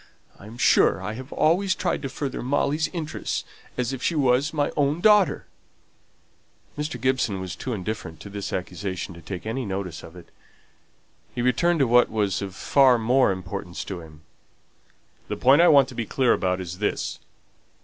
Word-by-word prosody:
I 100 - -12
am 115 +2 -11
sure - - +4
I 100 +3 -4
have 130 +4 -9
always 185 +4 +2
tried - - -1
to 135 - -4
further 140 0 -4
Molly's 145 +4 0
interests 160 -4 -4 0.3
as 125 +1 -1
if 130 - -6
she 170 - 0
was 135 +1 +2
my 145 -2 0
own 145 +2 +1
daughter." 210 -1 +4 1.3
Mr. 150 +2 -4
Gibson 130 -7 0
was 95 -1 -5
too 130 - -5
indifferent 100 -6 -5
to 100 - -9
this 100 -1 -5
accusation 95 +1 -4
to 85 - -12
take 90 +4 -7
any 120 +4 -2
notice 95 -5 -4
of 80 - -13
it. 90 -2 -13 1.1
He 120 - -1
returned 170 +8 +2
to 135 - +4
what 120 +1 +5
was 105 -3 -1
of 95 -2 -6
far 130 0 +4
more 125 +1 +3
importance 90 -1 -5
to 90 -3 -6
him. 80 -1 -14 1.1
"The - - -4
point 135 +5 +5
I 175 - +6
want 140 -4 +6
to - - -9
be 115 -3 -4
clear 130 -3 +2
about 90 0 0
is 90 0 -6
this. 105 - -2
120 Hz, 180 wpm, -24 LUFS, 95-140 Hz, 1.3 s, I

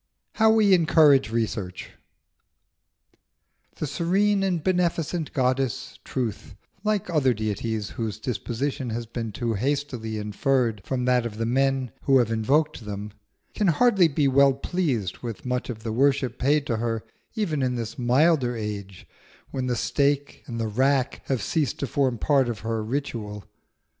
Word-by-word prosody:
HOW 220 0 +4
WE 210 -3 +5
ENCOURAGE 155 -7 +5
RESEARCH. 110 -5 -3 1.8
The - - -3
serene 195 +7 +1
and 180 -5 0
beneficent 175 -3 0
goddess 130 -3 -1
Truth, 110 -5 -4 0.3
like 215 -2 0
other 135 -6 +3
deities 110 0 -3
whose 110 -3 -4
disposition 125 +3 -3
has 115 +1 -3
been 115 -1 -5
too 115 +2 -2
hastily 125 -2 -2
inferred 110 +1 0
from 125 +2 -2
that 125 -2 +2
of 105 -2 -10
the 115 - -1
men 135 0 +1
who 135 -1 +5
have 120 -3 +2
invoked 135 +5 +1
them, 105 0 -6 0.4
can 210 - +1
hardly 190 +1 +4
be 145 -1 +1
well 135 +1 +5
pleased 135 - -2
with 115 -1 -7
much 125 0 -2
of 110 -2 -6
the 110 -2 -3
worship 135 -1 +1
paid 145 +2 +2
to 115 - -1
her 115 -1 -2 0.3
even 170 - -1
in 125 -1 0
this 115 0 -5
milder 125 0 +3
age, 100 -3 -6 0.5
when 130 -1 -2
the 125 - 0
stake 140 +3 0
and 115 -2 -5
the 115 - -1
rack 130 +4 +1
have 130 -3 -1
ceased 155 -5 0
to - - -2
form 130 -1 0
part 135 +1 +2
of 115 -4 -4
her 115 -1 -2
ritual. 110 -5 -4
130 Hz, 155 wpm, -25 LUFS, 115-145 Hz, 1.8 s, WE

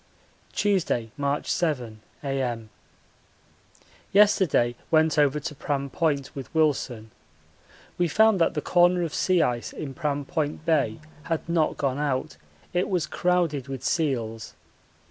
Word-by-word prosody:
Tuesday, 175 - 0
March 140 0 -1
7, 125 -10 -1 0.2
A.M. 125 -5 -2 1.4
Yesterday 190 -12 +4 0.2
went 160 -1 +3
over 145 0 +3
to 150 +1 -5
Pram 140 -1 -3
Point 145 -5 -1
with 135 -2 -7
Wilson. 130 -8 0 0.9
We 175 - +3
found 215 +2 +4
that 165 - +2
the 150 - -1
corner 175 0 +4
of 165 - -3
sea 180 -3 +3
ice 120 -4 -2
in 145 -3 -6
Pram 145 -2 -2
Point 155 -1 -3
Bay 160 -1 +1 0.3
had 165 -1 -2
not 170 -2 +1
gone 140 -1 -1
out 140 -3 -2 0.4
it 180 +1 0
was 180 -4 0
crowded 170 -7 0
with 135 -1 -6
seals. 115 -8 -1
150 Hz, 130 wpm, -26 LUFS, 135-170 Hz, 1.4 s, Yesterday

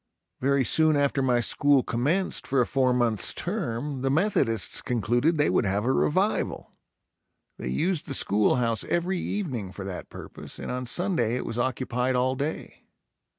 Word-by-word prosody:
Very 140 0 +2
soon 155 +3 +4
after 140 -1 +1
my 125 -2 +2
school 140 +2 +3
commenced 150 +11 -1
for 135 - +1
a 125 - +4
four 130 0 +1
months 120 -5 +1
term 145 - -3
the 135 - 0
Methodists 135 - +2
concluded 120 +7 +1
they 150 - +3
would 105 - +2
have 100 +3 0
a 130 - +2
revival. 75 0 0 0.9
They - - -5
used 165 - -1
the 135 - -2
school 105 -2 +3
house 115 -2 0
every 175 +2 -1
evening 130 - -3
for 95 0 -8
that 95 -2 -7
purpose - - -9
and - - -5
on 125 0 -4
Sunday 150 - 0
it 125 - -3
was 115 - -4
occupied 130 0 -1
all 130 +1 +1
day. 145 +4 -5
130 Hz, 165 wpm, -26 LUFS, 115-150 Hz, 0.9 s, soon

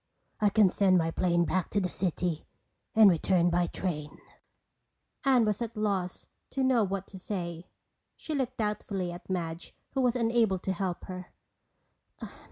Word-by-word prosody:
I 210 -2 +4
can 200 -2 +4
send 190 -2 +4
my 165 -1 +1
plane 175 0 +2
back 185 0 -1
to 205 - +1
the 185 - 0
city 175 -2 -2 0.5
and 220 -1 +8
return 175 0 +3
by 175 0 +2
train." 150 -6 -4 1.1
Anne 255 -4 +5
was 210 +1 -1
at 230 0 -4
a - - -5
loss 195 -4 -1 0.2
to 270 - -1
know 255 -4 +4
what 195 -1 -2
to 190 - -10
say. 175 -3 -5 0.5
She 315 - -6
looked 260 -3 -2
doubtfully 205 -4 -2
at 175 +2 -10
Madge 170 -2 -4 0.2
who 270 - 0
was 250 -1 +2
unable 230 -4 +2
to 190 +1 -2
help 185 -1 -3
her. 185 -1 -7
190 Hz, 165 wpm, -29 LUFS, 175-220 Hz, 1.1 s, and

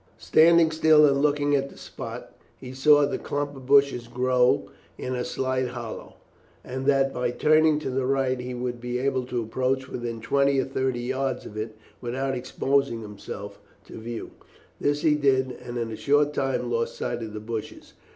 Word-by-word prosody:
Standing 165 0 +5
still 155 -1 +5
and 140 -1 +3
looking 145 0 +2
at 140 0 0
the - - -16
spot, - - -8 0.2
he 125 0 -9
saw 145 +3 +5
that 145 - +1
the - - -2
clump 145 0 -3
of 130 -1 -11
bushes 140 -4 +4
grew 125 0 +2 0.3
in 130 - -4
a 125 -1 -2
slight 130 +1 -1
hollow, 120 -2 -7 0.5
and 130 +1 -5
that 135 -1 +3
by 125 -1 -1
turning 155 +4 +3
to 150 -3 -4
the 130 0 -1
right 135 -1 +1
he 125 0 -5
would 120 -1 -4
be 125 0 -3
able 130 0 0
to 125 -2 -2
approach 130 +3 -1
within 120 -3 -5
twenty 140 +4 +2
or - - +1
thirty 130 -2 -1
yards 130 +1 -2
of 105 - -10
it 110 0 -5 0.2
without 130 +3 -2
exposing 130 -1 0
himself 100 -1 -8 0.3
to - - -10
view. 115 +1 -6 0.5
This 145 0 0
he 155 -2 +4
did, 135 -3 +2
and 120 0 -8
in 115 -1 -3
a - - -4
short 145 +6 +2
time 135 -3 -1
lost 115 0 -1
sight 120 0 -3
of 110 -2 -6
the 105 - -5
bushes. 110 0 -7
130 Hz, 190 wpm, -25 LUFS, 120-140 Hz, 0.5 s, Standing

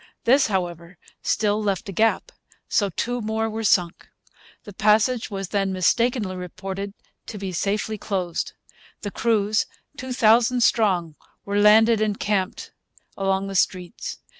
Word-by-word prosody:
This, 265 +4 +4
however, 175 -3 -3 0.2
still 210 0 +1
left 200 +1 -2
a - - -4
gap; 225 - +1 0.4
so 200 -2 +1
two 245 +7 -3
more 220 +1 -1
were 225 0 -4
sunk. 180 -4 +1 0.6
The 205 - -11
passage 215 +4 +2
was 195 -2 -5
then 195 -2 0
mistakenly 205 +2 +1
reported 190 +2 -6 0.3
to 215 - -7
be 195 -1 -4
safely 205 +4 -2
closed. 185 -5 -3 0.5
The 205 - -5
crews, 215 -1 +1 0.3
two 260 -1 -6
thousand 240 +1 +4
strong, 180 -10 +2 0.3
were 200 0 0
landed 220 +1 +6
and 210 -1 0
camped 200 -2 -2 0.4
along 195 0 0
the 195 - -5
streets. 185 +2 -1
205 Hz, 140 wpm, -23 LUFS, 190-220 Hz, 0.6 s, landed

